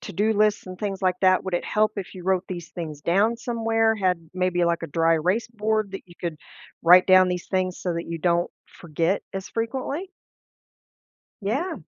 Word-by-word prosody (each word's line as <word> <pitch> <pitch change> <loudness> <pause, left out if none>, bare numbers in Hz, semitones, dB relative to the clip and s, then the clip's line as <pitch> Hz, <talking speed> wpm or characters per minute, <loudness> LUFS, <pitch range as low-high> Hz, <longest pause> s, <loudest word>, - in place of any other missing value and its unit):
to-do 205 +3 0
lists 210 -1 +2
and 185 - -8
things 195 0 -4
like 185 -2 +2
that? 185 0 +4
Would 190 - -3
it 175 - -1
help 215 0 +1
if 195 -3 -5
you 180 -2 -10
wrote 190 -1 +2
these 175 -3 -6
things 155 -4 -7
down 205 +7 +2
somewhere, 225 -1 +1
had 180 -5 -1
maybe 180 -1 +1
like 170 0 0
a 165 - -4
dry 165 +2 +2
erase 180 +8 0
board 215 -2 -1
that 195 - -6
you 175 - -16
could 170 -3 -3 0.5
write 180 +2 +7
down 185 -1 +6
these 180 -1 -3
things 185 -1 -1
so 180 -2 -2
that 170 - -4
you 165 0 -4
don't 170 +1 +1 0.3
forget 170 +3 -1
as 195 0 -5
frequently? 265 +10 -3 1.3
Yeah. 275 - -1
185 Hz, 190 wpm, -24 LUFS, 175-215 Hz, 1.3 s, write